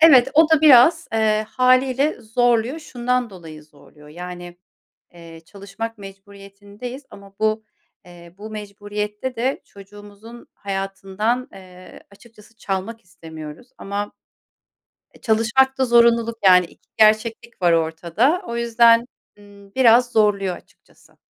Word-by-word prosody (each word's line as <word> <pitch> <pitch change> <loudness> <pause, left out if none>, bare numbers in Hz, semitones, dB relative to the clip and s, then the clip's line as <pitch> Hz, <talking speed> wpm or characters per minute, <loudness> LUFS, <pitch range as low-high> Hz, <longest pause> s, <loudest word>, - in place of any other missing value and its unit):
Evet, 270 -5 +6
o 320 +1 +5
da 320 -2 +4
biraz, 310 +3 +6
eee, 215 -1 0
hâliyle 255 +3 +1
zorluyor. 240 +4 0
Şundan 250 -4 -3
dolayı 160 -5 -12
zorluyor, 150 0 -20
yani, 175 +1 -10 0.6
eee, 165 -1 -14
çalışmak 200 +4 -8
mecburiyetindeyiz 200 +5 -12
ama 200 0 -15
bu, 220 0 0 0.4
eee, 175 -1 -16
bu 215 +2 -10
mecburiyette 210 +3 -6
de 255 +4 -2
çocuğumuzun 205 +3 -15
hayatından, 195 +5 -4
eee, 185 -1 -14
açıkçası 215 +1 -20
çalmak 200 +4 -5
istemiyoruz. 160 - -12
Ama 205 +1 -5 1.0
E, - - -20
çalışmakta 260 +4 +1
zorunluluk, 235 -1 +3
yani, 180 -2 +6
2 - - -24
gerçeklik 220 0 +1
var 175 - +4
ortada. 170 - 0
O 235 - -5
yüzden, 235 0 +3 0.3
ımm, 200 -1 -18
biraz 245 -1 +4
zorluyor 200 -4 +1
açıkçası. - - -23
215 Hz, 115 wpm, -20 LUFS, 195-240 Hz, 1.0 s, Evet